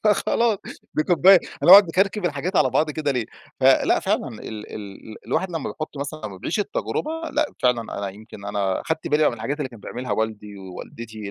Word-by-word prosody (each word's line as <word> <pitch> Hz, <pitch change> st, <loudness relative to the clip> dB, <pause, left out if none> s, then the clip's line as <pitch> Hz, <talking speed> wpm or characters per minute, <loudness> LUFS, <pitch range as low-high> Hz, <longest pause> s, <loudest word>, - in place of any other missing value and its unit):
فخلاص، 215 Hz, +1 st, +2 dB, 0.4 s
دي 155 Hz, -, +2 dB
كوباية 185 Hz, +3 st, +6 dB, 0.2 s
هنقعد 195 Hz, +3 st, +10 dB
نكركب 195 Hz, +3 st, +1 dB
الحاجات 175 Hz, +4 st, -1 dB
على -, -, +4 dB
بعض 155 Hz, 0 st, +1 dB
كده 150 Hz, -1 st, -1 dB
ليه؟ 120 Hz, -4 st, -2 dB, 0.3 s
فلأ، 130 Hz, 0 st, +4 dB
فعلًا 200 Hz, -6 st, 0 dB
ال 115 Hz, -4 st, -10 dB, 0.3 s
ال 105 Hz, +1 st, -9 dB
ال -, -, -9 dB
الواحد 165 Hz, +10 st, -1 dB
لمّا 165 Hz, -4 st, -3 dB
بيحط 155 Hz, -2 st, -7 dB
مثلًا 145 Hz, +2 st, -5 dB
لمّا 95 Hz, -2 st, -9 dB
بيعيش 175 Hz, -, -2 dB
التجربة 210 Hz, +8 st, -2 dB, 0.2 s
لأ، 305 Hz, 0 st, +2 dB, 0.2 s
فعلًا 125 Hz, -2 st, +3 dB, 0.2 s
أنا 100 Hz, -1 st, -3 dB
يمكن 100 Hz, 0 st, -12 dB
أنا 100 Hz, -2 st, -1 dB
أخدت 160 Hz, 0 st, -3 dB
بالي 150 Hz, 0 st, +4 dB
من 120 Hz, -, -3 dB
الحاجات 135 Hz, +6 st, -3 dB
بقى -, -, -9 dB
اللي 130 Hz, -, -4 dB
كان 115 Hz, -3 st, -13 dB
بيعملها 120 Hz, +1 st, -5 dB
والدي 105 Hz, -1 st, -3 dB
ووالدتي 105 Hz, +3 st, -8 dB
140 Hz, 195 wpm, -23 LUFS, 110-175 Hz, 0.4 s, هنقعد